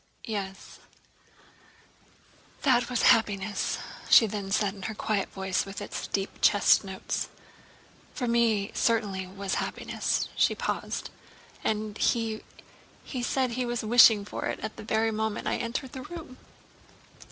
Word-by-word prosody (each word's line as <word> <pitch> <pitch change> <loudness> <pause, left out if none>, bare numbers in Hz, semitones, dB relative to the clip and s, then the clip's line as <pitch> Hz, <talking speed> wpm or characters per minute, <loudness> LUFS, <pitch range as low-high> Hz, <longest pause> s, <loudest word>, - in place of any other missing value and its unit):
"Yes, 195 -4 -6 1.8
that 250 -3 +3
was 250 -2 0
happiness," 205 -2 -1 0.3
she 225 - +8
then 205 -2 -4
said 200 -1 +1
in 200 - -12
her 220 +3 -4
quiet 205 -2 -1
voice 190 -1 -1
with 195 0 -7
its 205 - -5
deep 195 0 -3
chest 205 - +5
notes. 190 -1 -3 0.9
"For 250 - -2
me 230 -3 +2
it - - -10
certainly 205 -5 +1
was 195 +1 -3
happiness." - - -2
She - - +3
paused. - - -3 0.5
"And 215 -1 -2
he... 225 -2 +1 0.7
he... 260 - -5
he - - -2
said 255 +1 0
he 250 +1 -1
was 240 -1 -2
wishing 220 -2 +7
for - - -5
it - - -3
at 220 +1 -5
the - - -9
very 220 +1 +1
moment 220 0 -2
I - - 0
entered 245 +2 -3
the 260 - -7
room...." 315 -3 -9
215 Hz, 145 wpm, -28 LUFS, 200-235 Hz, 1.8 s, she